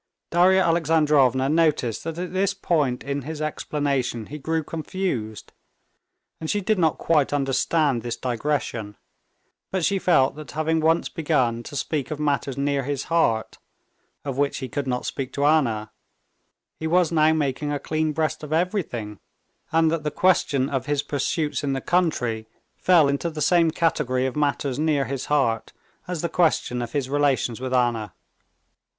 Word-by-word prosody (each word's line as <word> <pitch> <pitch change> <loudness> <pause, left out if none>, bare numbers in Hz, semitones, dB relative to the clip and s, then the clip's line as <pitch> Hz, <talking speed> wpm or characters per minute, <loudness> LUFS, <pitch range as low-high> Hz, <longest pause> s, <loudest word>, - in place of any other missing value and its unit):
Darya 185 +2 +5
Alexandrovna 150 -6 +3
noticed 150 -7 +1
that 165 0 -4
at 180 +1 -5
this 195 +1 +1
point 150 -10 0
in 140 +1 -3
his 155 +3 -6
explanation 140 -6 -2
he 150 +6 -8
grew 160 +2 -1
confused, 155 - -4 0.9
and 160 - -5
she 205 - +1
did 205 +1 0
not 160 -3 +2
quite 150 -4 +2
understand 140 -1 +1
this 120 0 -4
digression, 120 -4 -2 0.7
but 190 -3 0
she 200 -1 +1
felt 140 -8 +3
that 150 -4 -9
having 160 +1 0
once 160 +2 +2
begun 130 -8 0
to 130 - -9
speak 140 -1 -2
of 155 - -4
matters 140 -3 -1
near 140 0 0
his 140 0 -3
heart, 115 -10 +1 0.7
of 135 -1 -3
which 145 0 +1
he 130 - -4
could 140 +1 -4
not 125 -1 -2
speak 130 -1 -4
to 140 - 0
Anna, 115 -9 +2 0.9
he 160 - -2
was 175 0 +3
now 155 -1 +4
making 145 -1 -1
a 145 - 0
clean 155 +2 -1
breast 155 0 -1
of 150 -1 -8
everything, 155 - -2 0.5
and 160 0 +3
that 165 -1 -1
the 150 - -1
question 150 -7 +2
of 135 -2 -3
his 145 -1 0
pursuits 150 +2 -1
in 140 -1 0
the 135 - -1
country 125 -11 0 0.3
fell 170 -5 +4
into 140 +4 -1
the 155 -1 -7
same 165 +2 +4
category 150 -6 0
of 130 - -2
matters 145 -2 0
near 150 -3 +1
his 135 +1 -4
heart, 115 -7 0 0.3
as 175 -3 -4
the - - +1
question 160 -7 +1
of 120 - -5
his 140 -3 -1
relations 135 -4 0
with 130 -1 -3
Anna. 120 -5 0
145 Hz, 165 wpm, -24 LUFS, 130-160 Hz, 0.9 s, Darya